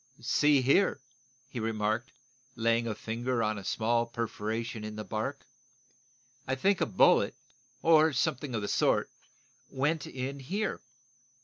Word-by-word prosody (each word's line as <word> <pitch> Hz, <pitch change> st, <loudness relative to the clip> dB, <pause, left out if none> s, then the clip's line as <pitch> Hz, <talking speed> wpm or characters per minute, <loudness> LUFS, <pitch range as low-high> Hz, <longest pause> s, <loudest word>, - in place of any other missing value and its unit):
"See 145 Hz, -3 st, +3 dB
here," 145 Hz, +6 st, +3 dB, 0.5 s
he 130 Hz, -2 st, -6 dB
remarked, 110 Hz, +2 st, -1 dB, 0.5 s
laying 115 Hz, 0 st, +1 dB
a 110 Hz, -, -2 dB
finger 115 Hz, +2 st, -2 dB
on 110 Hz, -1 st, -1 dB
a -, -, -10 dB
small 115 Hz, +4 st, +1 dB
perforation 115 Hz, -1 st, -4 dB
in 105 Hz, 0 st, -6 dB
the 105 Hz, -, -5 dB
bark, 110 Hz, +7 st, -4 dB, 1.0 s
"I 130 Hz, -, 0 dB
think 190 Hz, +8 st, +1 dB
a -, -, +2 dB
bullet, -, -, +4 dB, 0.5 s
or 160 Hz, -1 st, +6 dB
something 130 Hz, 0 st, -1 dB
of 110 Hz, -, -2 dB
the -, -, -2 dB
sort, -, -, +1 dB, 0.6 s
went 145 Hz, +3 st, -1 dB
in 135 Hz, +2 st, -5 dB
here." 195 Hz, +11 st, -3 dB
120 Hz, 135 wpm, -30 LUFS, 110-140 Hz, 1.0 s, or